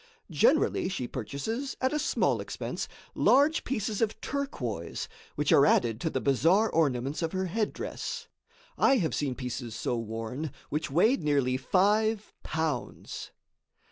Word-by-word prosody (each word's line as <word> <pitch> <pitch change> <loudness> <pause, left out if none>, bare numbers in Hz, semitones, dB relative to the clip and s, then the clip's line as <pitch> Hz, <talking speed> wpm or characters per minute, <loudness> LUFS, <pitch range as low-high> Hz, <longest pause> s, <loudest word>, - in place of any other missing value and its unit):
Generally - - +3
she 130 -10 -3
purchases, 225 - -4
at 260 +1 +1
a 305 - +1
small - - +1
expense, - - -4 0.3
large 295 +4 +4
pieces 215 -4 -2
of 220 -1 0
turquoise, 125 - -3 0.3
which - - +1
are - - +7
added 115 -2 +3
to 160 - 0
the - - -1
bizarre 165 - +3
ornaments 140 -2 +1
of 165 +1 -2
her 190 0 0
headdress. 230 - -3 0.5
I 270 - +5
have 170 -8 0
seen 140 -4 -1
pieces 125 -3 -5
so - - -1
worn 115 +6 -4 0.2
which 155 +2 -1
weighed 185 - +3
nearly 140 -4 +2
five 210 +9 +2
pounds. 155 -5 -3
160 Hz, 140 wpm, -29 LUFS, -, 0.5 s, are